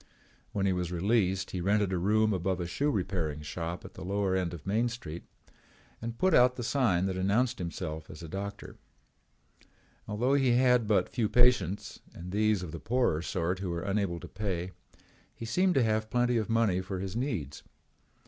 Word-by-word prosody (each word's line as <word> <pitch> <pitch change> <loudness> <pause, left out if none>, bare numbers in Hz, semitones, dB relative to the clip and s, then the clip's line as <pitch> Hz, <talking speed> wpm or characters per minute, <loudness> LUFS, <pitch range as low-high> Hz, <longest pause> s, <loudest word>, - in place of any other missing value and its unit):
When 100 -1 -1
he 95 - +3
was 90 -1 -2
released 95 0 +1
he 90 - -3
rented 100 +1 +2
a - - +1
room 110 +3 +3
above 95 0 -1
a 90 - -2
shoe 140 +12 0
repairing 90 - -1
shop 85 +3 -5
at - - -10
the - - -9
lower 95 0 0
end 90 -2 0
of 85 -4 -9
Main 110 +5 +1
Street 85 -9 -7 0.8
and 115 0 -5
put 185 +4 +2
out 125 -1 +6
the 125 - -5
sign 115 -9 +2
that 95 -1 -1
announced 110 +7 +1
himself 80 -3 -5
as 80 - -10
a - - -6
doctor. 100 +4 -6 1.3
Although 115 +6 +1
he 135 -3 +4
had 125 -2 +4
but 105 -2 +3
few 115 -5 -1
patients 120 -6 +2 0.2
and 90 +1 -8
these 105 -1 +2
of 85 - -6
the 85 - -6
poorer 110 - +1
sort 90 +1 -1
who 95 -2 -3
were 85 0 -3
unable 100 -3 -1
to - - -9
pay, 95 -3 -3 0.6
he 115 - -7
seemed 180 +9 +2
to 135 - +4
have 110 -1 0
plenty 120 0 +2
of 110 -1 -1
money 115 -5 +2
for 95 0 -5
his 95 +1 -5
needs. 110 - -3
100 Hz, 190 wpm, -30 LUFS, 90-115 Hz, 1.3 s, out